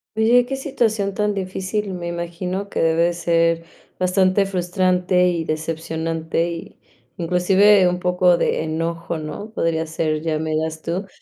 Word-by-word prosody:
Oye, 240 +3 +4
que 270 - -3
situación 220 -7 -1
tan 210 0 0
difícil, 195 +1 -3
me 175 - -6
imagino 180 +3 -4
que - - -3
debe 165 0 +2
de 175 - +1
ser 165 -1 +1 0.3
bastante 185 +1 +2
frustrante 180 -1 +1
y 170 -2 -1
decepcionante, 160 +1 -2
y 165 - -8 0.4
inclusive 185 +3 +4
un 180 - -1
poco 180 -1 +3
de - - 0
enojo, 165 +1 -3
¿no? 155 +7 -6
Podría 165 -3 0
ser, 155 -1 -1
ya 160 -1 -1
me 155 0 -3
dirás 160 0 -2
tú, 185 +4 -3
175 Hz, 150 wpm, -21 LUFS, 165-190 Hz, 0.4 s, Oye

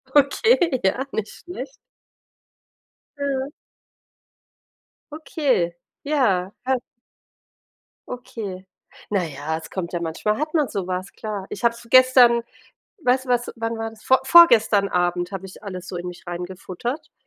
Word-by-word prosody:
Okay, 310 - +4
ja, 255 +8 +1
nicht 215 0 -3
schlecht. 285 -6 -8 1.5
Ja. 275 -1 -2 1.6
Okay, 290 - 0 0.3
ja. 210 -11 +1
Kann 260 -1 +1 1.3
Okay. 210 -6 -7 0.4
Na 200 -3 +1
ja, 155 +1 -4
es 160 - -10
kommt 175 -3 -4
ja 175 - -2
manchmal 170 +6 -1
hat 305 +2 -2
man 300 -5 +2
so 190 -3 -3
was, 185 +1 -3
klar. 210 -3 -5
Ich 205 - -7
habe 235 - +4
es 235 0 -13
gestern 255 -2 +7 0.6
weißt 260 +1 +2
du, - - -12
was 245 -1 +1
wann 225 -1 -3
war 225 0 -3
das? 220 -1 -17
Vor 260 - +4
vorgestern 225 -11 +6
Abend 175 0 0
habe 195 -1 -6
ich 190 - -13
alles 185 -3 -7
so 180 - -6
in 175 +1 -5
mich 180 +1 -11
reingefuttert 185 - -5
225 Hz, 140 wpm, -23 LUFS, 185-260 Hz, 1.6 s, gestern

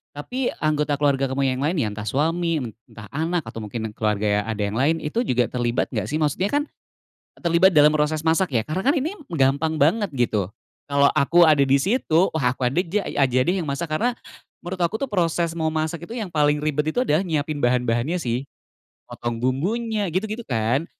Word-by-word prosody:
Tapi 245 - -3
anggota 150 -1 +1
keluarga 140 -2 +1
kamu 135 +1 -1
yang 130 - -3
lain 150 +6 0
ya 110 - 0
entah 105 +1 -7
suami, 165 - 0 0.2
entah 105 -2 -12
anak, 165 +3 -1
atau 115 -1 -8
mungkin 110 0 -5
keluarga 105 -1 0
ada 110 -2 -3
yang 100 +3 -2
lain 160 +5 +1
itu 150 +10 -2
juga 125 -1 +1
terlibat 120 -1 -1
enggak 110 -5 -2
sih? 150 - -3
Maksudnya 155 +5 0
kan 290 +7 +1 0.8
terlibat 170 +2 +4
dalam 150 0 +7
proses 155 0 0
masak 165 -2 +1
ya, 115 - +3
karena 180 - -4
kan 280 - +4
ini 325 +7 -2
m 290 - -16
gampang 140 +3 +2
banget 165 +4 +1
gitu. 110 -7 0 0.4
Kalo 140 0 +3
aku 160 +4 +3
ada 150 -4 +6
di 135 - +3
situ, 190 -6 +2
wah 130 -5 0
aku 125 -1 0
ada 150 - -2
ja 200 +5 -1
ya 135 - +2
aja 130 0 0
deh 180 +7 0
yang 170 - -3
masak, 145 +3 -3
karena 235 +11 0 0.5
menurut 180 +2 -5
aku 175 +3 0
tuh 275 - -2
proses 170 -3 0
memasak 160 +1 -2
itu 230 - -8
yang 220 -6 -4
paling 150 -2 +2
ribet 150 +1 -1
itu 250 - +2
adalah 185 -5 +1
nyiapin 155 -2 -1
bahan-bahannya 125 +3 +1
sih. 125 +2 -2 0.6
Motong 120 -1 -4
bumbunya, 205 - -1
gitu-gitu 215 +5 -2
kan. 120 +6 0
150 Hz, 195 wpm, -23 LUFS, 130-175 Hz, 0.8 s, dalam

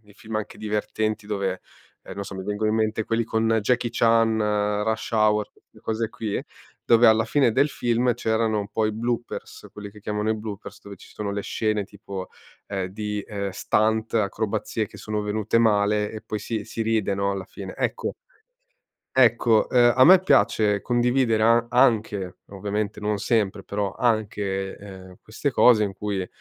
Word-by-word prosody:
nei 105 -1 -20
film 110 +1 -9
anche 110 -1 -4
divertenti 110 0 -2
dove, 95 -3 -2 0.6
non 100 - -4
so, 100 - -8
ehm, 95 - -5
mi 95 - -8
vengono 105 +1 0
in 110 - +1
mente 110 0 0
quelli 115 0 0
con 110 0 -1 0.2
Jackie 120 +1 +1
Chan, 115 -1 +3 0.5
Rush 110 +2 -2
Hour, 105 -1 +3
queste - - -24
cose 110 0 -2
qui, 110 -2 -4 0.4
dove 120 0 +5
alla 110 0 +5
fine 125 0 +2
del 140 +6 +3
film 120 -2 0
c'erano 110 -2 0
poi 110 +1 0
bloopers, 120 +2 -4
quelli 100 -1 -9
che 105 - -14
chiamano 105 +1 -2
i - - +2
bloopers, 105 -2 -8
dove 100 -1 -10
ci - - -16
sono 105 -1 -3
le 100 0 -2
scene 110 -2 -1
tipo, 100 -2 -8 0.4
ehm, 95 -2 -3
di, 105 +1 -4
ehm, 100 -2 -4
stunt, 110 +3 0
acrobazie 110 0 -1
che - - -13
sono 105 -1 -3
venute 110 +2 0
male 105 -1 +2
e 110 - -7
poi 105 -1 -5
si 110 -2 -4
si 115 - -4
ride 110 -3 0
no 100 0 0
alla 100 -1 -4
fine. - - -9
Ecco - - -2 1.0
ecco, 115 -3 +4
uhm, 120 -1 +5
a 130 - +7
me 185 +2 +8
piace 105 - +3
condividere 120 -1 +1
a 115 +1 +4
anche, 105 -7 +2
ovviamente 105 +1 -3
non 105 -1 -1
sempre, 105 -3 0
però 100 -1 -2
anche, 100 -4 -1
ehm, 95 -2 -11
queste 125 +6 -3
cose 120 -3 +5
in 100 -2 -2
cui 100 -1 -3
110 Hz, 175 wpm, -24 LUFS, 100-115 Hz, 1.0 s, me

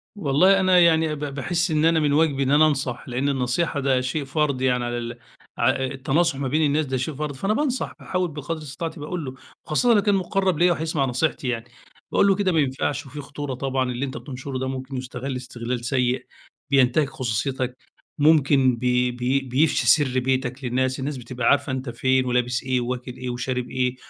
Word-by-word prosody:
والله، 185 +2 +4
أنا 185 -1 +5
يعني 160 -2 +4
ب - - -9
باحس 150 +5 -1
إن 155 0 +2
أنا 165 0 +4
من 145 -2 +1
واجبي 145 -3 +2
إن 135 - 0
أنا 155 +2 +6
أنصح، 135 -4 -2
لأن 130 +3 0
النصيحة 135 +4 0
ده 130 -2 +2
شيء 135 +3 -2
فرض 140 -1 0
يعني 125 -2 +1
على 120 0 -2
ال 120 0 -5 0.4
ع 120 - +3
التناصح 135 +4 0
ما 140 - -1
بين 150 +5 +1
الناس 150 +2 +1
ده 130 -1 -2
شيء 130 +5 -3
فرض، 145 0 -4
فأنا 195 +10 0
بانصح 260 0 -1
باحاول 185 -2 -2
بقدر 150 +2 -4
استطاعتي، 160 +2 -6
باقول 155 +2 -4
له، 130 - -6 0.3
وخاصةً 235 +11 +3
لو 210 - +4
كان 205 0 +2
مقرّب 190 -2 0
ليَّ 175 +1 +5
وهيسمع 160 -4 0
نصيحتي 130 +2 -1
يعني، 115 -2 -2 0.5
باقوله 200 -1 +4
كده 195 -1 +1
ما 165 - +2
ينفعش، 145 +1 -1
وفي 145 +2 -8
خطورة 145 -1 -6
طبعًا، 130 0 -1
اللي 125 +3 -2
أنتَ 130 -2 -6
بتنشره 130 +2 -6
ده 130 - -2
ممكن 130 0 -5
يُستغل 130 +1 -5
استغلال 120 -1 -5
سيء، 125 0 0 0.4
بينتهك 135 +1 +3
خصوصيتَك، 130 +1 -2 0.4
ممكن 140 -4 +4
بي 125 +1 +1
بي 125 +2 0
بيفشي 135 0 +1
سر 130 0 +4
بيتَك 130 +1 -1
للناس، 130 +1 0
الناس 140 +1 -3
بتبقى 120 -1 -3
عارفة 140 -1 +3
أنتَ 130 0 -3
فين 130 +2 +1
ولابس 125 0 0
إيه 130 -1 0
وواكل 125 +1 -4
إيه 125 0 -5
وشارب 125 0 -3
إيه 125 -1 -1
135 Hz, 195 wpm, -23 LUFS, 125-155 Hz, 0.5 s, أنا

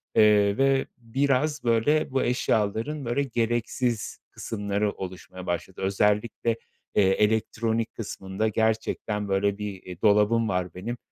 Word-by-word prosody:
Eee, 105 -1 +5
ve 135 0 +3
biraz, 135 +5 0
böyle, 120 +6 +2
bu 135 - +1
eşyaların, 120 +4 0
böyle, 120 +4 0
gereksiz 120 -1 -1
kısımları 105 -1 -2
oluşmaya 95 -1 -8
başladı. 85 +1 -4
Özellikle, 105 +4 +1 0.4
eee, - - +5
elektronik 110 +3 +1
kısmında 100 -1 -3
gerçekten, 110 -1 -1
böyle, 100 +1 +1
bir, 105 -3 -6
iii, 90 -1 -9
dolabım 105 +1 +4
var 90 -3 -1
benim, 115 +7 -5
110 Hz, 120 wpm, -26 LUFS, 100-120 Hz, 0.4 s, Eee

